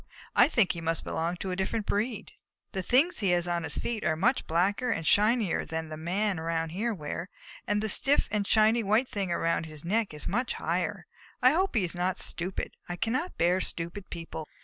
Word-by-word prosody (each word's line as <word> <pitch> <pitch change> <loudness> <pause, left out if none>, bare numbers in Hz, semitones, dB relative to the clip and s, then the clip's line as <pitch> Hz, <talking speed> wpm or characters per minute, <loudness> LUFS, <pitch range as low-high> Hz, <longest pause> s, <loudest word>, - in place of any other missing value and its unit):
I - - +7
think 235 - +3
he 170 - -6
must 165 0 -1
belong 170 +2 -2
to 190 +1 -4
a - - -1
different 200 +3 -2
breed. 215 +2 -2 0.4
The 190 - -2
things 270 - +3
he 200 -3 +1
has 175 0 +2
on 175 -1 0
his 160 -3 -1
feet 230 -3 -3
are 155 - +1
much 235 +11 +1
blacker 195 +9 +1
and 165 -8 -1
shinier 210 +1 +3
than 160 0 -4
the 155 - -5
Men 185 +4 -1
around 165 0 -1
here 210 +8 -1
wear, 165 -1 -5 0.4
and 210 0 +1
that 220 - 0
stiff 275 +8 +5
and 205 -2 0
shiny 220 +2 +4
white 220 +5 +2
thing 195 -3 -2
around 165 -1 0
his 155 0 -7
neck 215 +4 +1
is 150 -1 -8
much 245 +6 0
higher. - - -2 0.3
I 255 0 +6
hope 370 0 +1
he 215 - +3
is 175 - -2
not 180 +1 -1
stupid. 180 +2 -3 0.2
I 175 - -2
cannot 245 - -2
bear 180 +2 +2
stupid 170 +4 -4
people." 165 -2 -7
190 Hz, 210 wpm, -28 LUFS, 165-220 Hz, 0.4 s, I